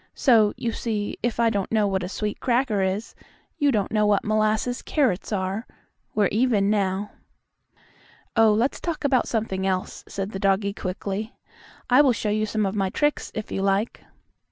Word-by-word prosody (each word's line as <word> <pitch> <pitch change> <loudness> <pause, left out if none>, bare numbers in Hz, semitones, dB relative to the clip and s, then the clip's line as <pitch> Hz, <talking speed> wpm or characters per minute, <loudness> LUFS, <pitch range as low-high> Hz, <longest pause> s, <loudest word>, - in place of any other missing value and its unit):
So, 225 -6 +4
you 235 - -2
see, 215 -3 -3
if 235 0 -1
I 230 -1 +4
don't 200 -3 -2
know 215 -2 +3
what 190 -1 0
a 180 - -4
sweet 210 +1 -3
cracker 240 -4 +1
is, 190 +4 -2 0.5
you 290 -1 +3
don't 210 -5 0
know 210 -1 +2
what 205 -1 +2
molasses 215 +3 +1
carrots 245 - 0
are. 195 +3 -2 0.5
We're 210 - +3
even 215 -3 +2
now." 200 -1 0 1.2
"Oh, 225 -1 +6
let's 230 +6 +1
talk 335 -3 -4
about 265 -3 +2
something 195 -4 -1
else," 185 -1 -2
said 195 +1 -4
the 195 - -5
doggie 195 +1 +1
quickly. 200 +3 -4 0.5
"I 255 +3 +6
will 270 -4 +4
show 215 -2 -2
you 215 +1 0
some 215 0 0
of 195 - -1
my 195 -2 0
tricks, 295 +9 0
if 215 -2 -5
you - - -2
like." 195 +3 0
210 Hz, 180 wpm, -24 LUFS, 195-230 Hz, 1.2 s, Oh